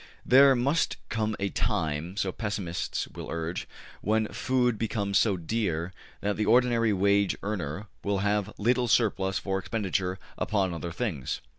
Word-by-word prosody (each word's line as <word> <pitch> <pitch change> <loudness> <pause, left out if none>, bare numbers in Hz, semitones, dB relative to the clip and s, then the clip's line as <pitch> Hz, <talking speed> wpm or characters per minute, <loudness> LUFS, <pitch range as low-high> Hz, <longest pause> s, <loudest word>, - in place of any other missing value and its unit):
There 135 +1 +7
must 140 +7 +1
come 110 -1 -1
a 100 0 0
time, 80 +2 -1
so 95 -2 0
pessimists 95 -5 -3
will - - -8
urge, 85 +2 -3 0.3
when 110 +1 +1
food 125 -3 +1
becomes 105 -3 +1
so 100 -4 +2
dear 85 -2 -2 0.3
that 100 0 -1
the 110 - +1
ordinary 120 -2 +4
wage 100 0 +2
earner 95 -2 -3 0.2
will 100 0 0
have 105 0 +1
little 120 +3 +2
surplus 100 -4 +2
for 95 -1 -1
expenditure 95 -3 -1 0.2
upon 100 -4 0
other 85 +1 -4
things. 85 - -3
100 Hz, 145 wpm, -28 LUFS, 95-115 Hz, 0.3 s, There